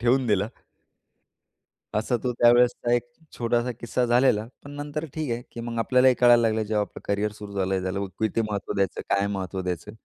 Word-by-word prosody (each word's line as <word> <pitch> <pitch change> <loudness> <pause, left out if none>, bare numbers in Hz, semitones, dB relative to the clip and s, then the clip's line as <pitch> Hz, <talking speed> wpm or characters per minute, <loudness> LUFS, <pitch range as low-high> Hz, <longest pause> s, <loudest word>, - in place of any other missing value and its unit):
ठेवून 125 +2 +2
दिला. 105 -2 +1 1.5
असा 110 +3 0
तो 125 - +1
त्यावेळेसचा 120 0 +4
1 120 - +2 0.4
छोटासा 120 +1 0
किस्सा 125 +1 0
झालेला. 120 -3 +3 0.2
पण 145 - -9
नंतर 145 +2 -4
ठीक 155 -4 -3
आहे, 120 +1 -2
की 120 - -6
मग 115 0 -5
आपल्यालाही 125 +2 +4
कळायला 120 -1 +7
लागलं 110 -1 +1
जेव्हा 105 0 0
आपलं - - -8
करियर 100 +1 0
सुरू 105 -1 -10
झालं 95 -2 -1
झालं - - -4
त्याला 95 +2 -2
किती 110 +1 +1
महत्त्व 100 -2 -3
द्यायचं? 100 -1 0
काय 100 0 +1
महत्व 95 -2 -3
द्यायचं? 90 +1 -4
115 Hz, 185 wpm, -25 LUFS, 100-120 Hz, 1.5 s, कळायला